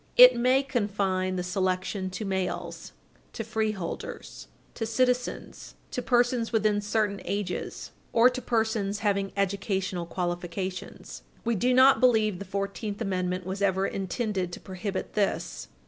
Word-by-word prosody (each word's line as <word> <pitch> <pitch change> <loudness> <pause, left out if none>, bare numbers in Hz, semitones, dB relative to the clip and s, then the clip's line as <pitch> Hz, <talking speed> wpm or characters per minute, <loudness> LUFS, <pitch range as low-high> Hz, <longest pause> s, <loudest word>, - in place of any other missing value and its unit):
It - - +10
may 255 +3 +3
confine 195 -7 0
the 180 - -2
selection 185 +1 -1
to 185 +3 -5
males, 190 -2 -3 0.4
to 225 - -4
freeholders, 215 -5 -4 0.3
to 225 - -3
citizens, 250 +1 -1 0.2
to 250 - -2
persons 245 -1 +2
within 215 -2 +2
certain 205 -2 0
ages, 200 -2 -4 0.2
or 230 +1 +6
to 255 0 -1
persons 220 -4 0
having 200 -1 +1
educational 195 -2 -1
qualifications. 175 +1 -4 0.2
We 235 - +2
do 245 +5 +2
not 260 +2 +6
believe 220 -6 +3
the 200 - -6
Fourteenth 200 +2 -3
Amendment 185 -3 -1
was 190 +2 -4
ever 190 -1 +2
intended 195 -1 -2
to - - -6
prohibit 190 +1 -5
this. 175 -5 -1
200 Hz, 130 wpm, -27 LUFS, 185-225 Hz, 0.4 s, It